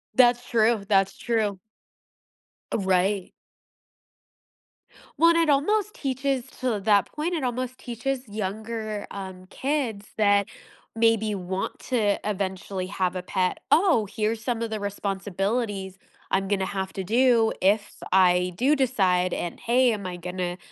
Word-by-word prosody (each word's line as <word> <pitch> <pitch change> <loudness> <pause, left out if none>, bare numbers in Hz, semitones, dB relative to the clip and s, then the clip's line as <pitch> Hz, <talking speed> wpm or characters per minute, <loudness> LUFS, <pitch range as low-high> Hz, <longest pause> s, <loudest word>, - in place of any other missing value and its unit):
That's 245 -1 +4
true, 225 -2 +2
that's 195 -2 +2
true. 215 -5 -1 1.2
Right. 190 0 +1 1.9
Well, 335 +1 +7
and 335 - +2
it 330 -2 +3
almost 415 +9 +2
teaches 270 -1 -1 0.2
to 235 -5 0
that 205 -1 +3
point, 325 +4 -2
it 310 -5 -2
almost 255 +1 -2
teaches 250 +2 -4
younger, 215 +1 -4
um, 190 -2 -8
kids 255 -6 -3
that 205 -1 +3 0.5
maybe 225 -2 +2
want 185 +1 -4
to 215 -6 +2
eventually 190 -2 -3
have 185 -1 -1
a - - -3
pet, 185 0 -1
"Oh, 320 - +4
here's 220 +1 -1
some 230 -1 -2
of 230 - -2
the 215 -1 -3
responsibilities 195 0 -2 0.3
I'm 195 0 +1
gonna 195 -1 0
have 190 -1 -4
to 190 - -4
do 230 +2 +3
if 205 +2 +1
I 180 -1 +4
do 275 +7 +3
decide, 190 -9 +2
and, 175 - -4
hey 245 +1 +3
am 200 -3 -4
I 180 - -5
gonna 180 0 -4
210 Hz, 135 wpm, -25 LUFS, 190-245 Hz, 1.9 s, Well